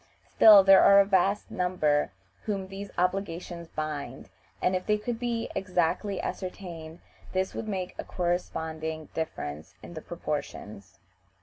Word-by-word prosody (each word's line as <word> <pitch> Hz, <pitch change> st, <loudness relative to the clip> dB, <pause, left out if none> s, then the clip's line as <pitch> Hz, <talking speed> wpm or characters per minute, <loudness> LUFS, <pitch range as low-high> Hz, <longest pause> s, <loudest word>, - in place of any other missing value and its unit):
Still 210 Hz, -3 st, +8 dB
there 195 Hz, 0 st, +8 dB
are 200 Hz, 0 st, +7 dB
a 200 Hz, -, +6 dB
vast 195 Hz, +1 st, +1 dB
number 155 Hz, -, +1 dB, 0.3 s
whom 200 Hz, -3 st, -2 dB
these 195 Hz, +1 st, -7 dB
obligations 175 Hz, -2 st, -2 dB
bind, 150 Hz, -5 st, -5 dB, 0.3 s
and, 185 Hz, -, +1 dB
if 185 Hz, -, -3 dB
they 210 Hz, 0 st, +3 dB
could 225 Hz, +2 st, -4 dB
be 235 Hz, -2 st, -2 dB
exactly 185 Hz, +1 st, -1 dB
ascertained, 170 Hz, -3 st, -6 dB, 0.3 s
this 190 Hz, 0 st, -1 dB
would 220 Hz, -, -5 dB
make 190 Hz, -3 st, -3 dB
a -, -, -2 dB
corresponding 160 Hz, -3 st, -3 dB
difference 80 Hz, -, -5 dB
in -, -, -10 dB
the 155 Hz, -, -7 dB
proportions. 105 Hz, -, -6 dB
180 Hz, 135 wpm, -28 LUFS, 160-195 Hz, 0.3 s, Still